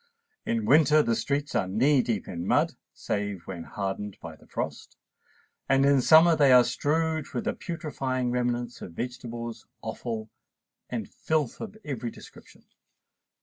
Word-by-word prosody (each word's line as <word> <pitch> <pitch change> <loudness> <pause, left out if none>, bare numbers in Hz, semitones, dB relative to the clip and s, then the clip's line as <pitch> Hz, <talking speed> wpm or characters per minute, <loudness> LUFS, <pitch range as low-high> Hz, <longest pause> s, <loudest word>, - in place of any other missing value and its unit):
In 230 -1 0
winter 155 - +5
the 115 - +1
streets 145 +3 -1
are 95 - +1
knee 130 +8 +3
deep 115 -5 -2
in 85 +1 -5
mud, - - +3 0.2
save 100 -3 -3
when 85 -4 -6
hardened 100 0 -4
by 80 -1 -9
the - - -21
frost; - - -5 0.7
and 135 0 +4
in 140 -1 +5
summer 160 +5 +7
they 145 -3 +5
are 125 -1 +8
strewed 155 +5 0
with 120 - -1
the - - -1
putrefying 135 -7 -3
remnants 120 -1 -1
of 85 - -8
vegetables, 120 +1 -6 0.2
offal, 110 -2 -5 0.6
and - - -3
filth 155 -6 -2
of 215 -1 -7
every 125 -5 -3
description. - - -15
125 Hz, 145 wpm, -27 LUFS, 110-150 Hz, 0.7 s, are